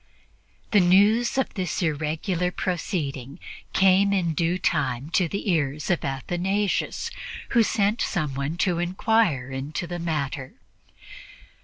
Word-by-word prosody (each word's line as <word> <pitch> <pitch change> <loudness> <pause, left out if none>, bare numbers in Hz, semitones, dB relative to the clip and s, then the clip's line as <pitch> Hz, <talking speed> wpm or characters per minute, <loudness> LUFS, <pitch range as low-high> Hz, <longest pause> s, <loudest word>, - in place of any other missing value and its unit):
The 210 - +6
news 205 +8 +4
of 265 - 0
this 185 -3 -2
irregular 160 +3 -1
proceeding 150 - -3 0.3
came 195 +1 +4
in 175 -4 +1
due 170 +2 +1
time 130 -4 -1
to 180 -1 +2
the 200 +3 -2
ears 150 -1 0
of 175 - 0
Athanasius, 180 +9 -1 0.4
who 235 - +4
sent 210 0 +1
someone 150 -2 -2
to 180 -2 +1
inquire 175 - +1
into 140 +6 -4
the 175 0 -5
matter. 145 -5 -3
175 Hz, 120 wpm, -25 LUFS, 145-195 Hz, 0.4 s, The